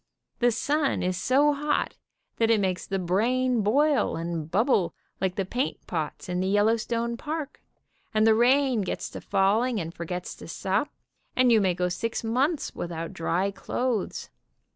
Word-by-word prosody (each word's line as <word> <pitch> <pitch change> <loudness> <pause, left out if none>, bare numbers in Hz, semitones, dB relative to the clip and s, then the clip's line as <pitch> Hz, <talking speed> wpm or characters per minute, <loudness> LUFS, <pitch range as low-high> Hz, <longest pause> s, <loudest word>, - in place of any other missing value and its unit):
The 245 - +4
sun 280 +5 0
is 180 0 0
so 275 +10 +3
hot 295 +1 -1 0.4
that 225 -1 +2
it 225 -2 +4
makes 185 -2 -1
the 195 - -1
brain 235 +7 +1
boil 280 +7 +2
and 165 -1 -4
bubble 205 - +2 0.2
like 185 -1 -1
the 195 - -1
paint 245 +8 -3
pots 160 +2 -4
in 180 0 -2
the 185 - 0
Yellowstone 230 +3 +1
Park, 305 +1 -5 0.5
and 215 0 +3
the 225 - +6
rain 250 +1 +3
gets 190 - -4
to - - -7
falling 215 +5 +2
and 165 -1 -5
forgets 175 +1 -5
to - - -10
stop, 195 - -1 0.5
and 255 -1 +4
you 225 -2 +5
may 185 -3 +2
go 180 0 0
six 230 +7 -3
months 270 +8 0
without 165 -1 -5
dry 180 +4 0
clothes. 240 +1 -2
220 Hz, 165 wpm, -26 LUFS, 185-255 Hz, 0.5 s, the